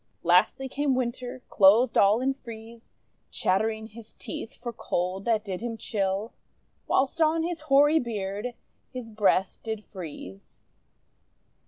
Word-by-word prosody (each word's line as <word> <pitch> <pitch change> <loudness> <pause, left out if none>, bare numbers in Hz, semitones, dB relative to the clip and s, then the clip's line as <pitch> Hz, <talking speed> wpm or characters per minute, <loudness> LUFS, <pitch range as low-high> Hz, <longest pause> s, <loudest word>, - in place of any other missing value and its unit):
Lastly 180 +10 +3
came 280 0 0
Winter 250 0 -3
clothed 220 +5 +5
all 205 +4 +5
in 270 +1 +1
frieze, 230 -3 -12 0.3
Chattering 220 +3 0
his 225 0 -12
teeth 225 - -7
for 240 -1 -6
cold 185 -1 -2
that 220 -2 +1
did 190 -2 -4
him 235 -1 -4
chill, 200 0 -2 0.5
Whilst 275 +5 +1
on 320 +1 +3
his 340 -1 -3
hoary 290 +3 +6
beard, 215 0 -4 0.4
his 250 -3 -7
breath 195 -3 +1
did 220 -2 -5
freeze. 145 - -10
225 Hz, 130 wpm, -27 LUFS, 200-255 Hz, 0.5 s, hoary